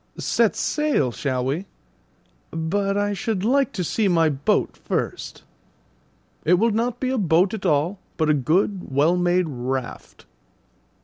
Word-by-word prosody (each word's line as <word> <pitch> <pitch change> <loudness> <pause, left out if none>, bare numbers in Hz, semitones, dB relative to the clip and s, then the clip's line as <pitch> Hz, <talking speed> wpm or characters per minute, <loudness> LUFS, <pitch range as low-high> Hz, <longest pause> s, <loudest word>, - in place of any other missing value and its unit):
"Set - - +1
sail, 300 - 0
shall 130 0 -2
we? 155 +9 -2 0.8
But 195 +5 -1
I 205 0 0
should 210 -2 -2
like 275 +3 +2
to 185 - -2
see 210 +5 0
my 165 -3 +3
boat 140 -1 0
first." - - -4 1.0
"It 180 - +4
will 225 +5 +2
not 230 +3 -1
be 255 -1 -1
a 260 - 0
boat 180 +1 +3
at 200 -3 -2
all, 165 +5 +1 0.2
but 155 - +1
a 155 - +4
good, 180 +7 0
well 145 +6 +3
made 180 0 +2
raft." 130 -2 -5
180 Hz, 145 wpm, -23 LUFS, 150-205 Hz, 1.0 s, It